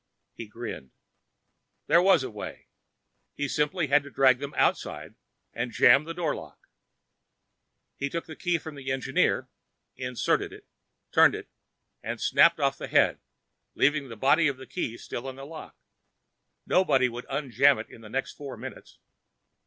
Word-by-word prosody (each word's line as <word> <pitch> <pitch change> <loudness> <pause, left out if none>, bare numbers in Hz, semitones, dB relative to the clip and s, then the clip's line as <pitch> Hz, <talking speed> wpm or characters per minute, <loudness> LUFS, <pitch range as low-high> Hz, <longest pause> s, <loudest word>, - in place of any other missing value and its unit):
He 115 - -8
grinned. 110 - -8 0.9
There 170 - +5
was 185 -6 +5
a - - -5
way. 105 - -9 0.7
He 145 - -2
simply 150 +4 0
had 145 +1 +4
to 140 - -11
drag 130 -2 +4
them 140 0 -6
outside - - 0 0.4
and 120 +1 -3
jam 135 +5 +5
the 165 - -5
door 165 -4 -1
lock. - - -10 1.4
He 140 - -2
took 170 +3 -4
the 160 - -9
key 175 -1 0
from 160 -1 -9
the 140 -2 -5
Engineer, 130 -1 +1 0.5
inserted 125 -1 -1
it, - - -13 0.5
turned - - +6
it, - - -9 0.5
and - - -5
snapped - - +4
off - - 0
the - - -5
head, - - +3 0.6
leaving 145 -1 +2
the 115 - -8
body 145 +8 +3
of 140 -2 -2
the 130 - -10
key 120 -10 -4
still 125 +3 -6
in 130 - -8
the 135 +1 -9
lock. 160 +2 -10 0.9
Nobody 135 -9 +3
would 120 0 -7
unjam 140 -1 +3
it 110 - -6
in 115 - -14
the 110 - -12
next 135 +4 -3
four 140 -3 -8
minutes. - - -10
135 Hz, 160 wpm, -27 LUFS, 125-150 Hz, 1.4 s, turned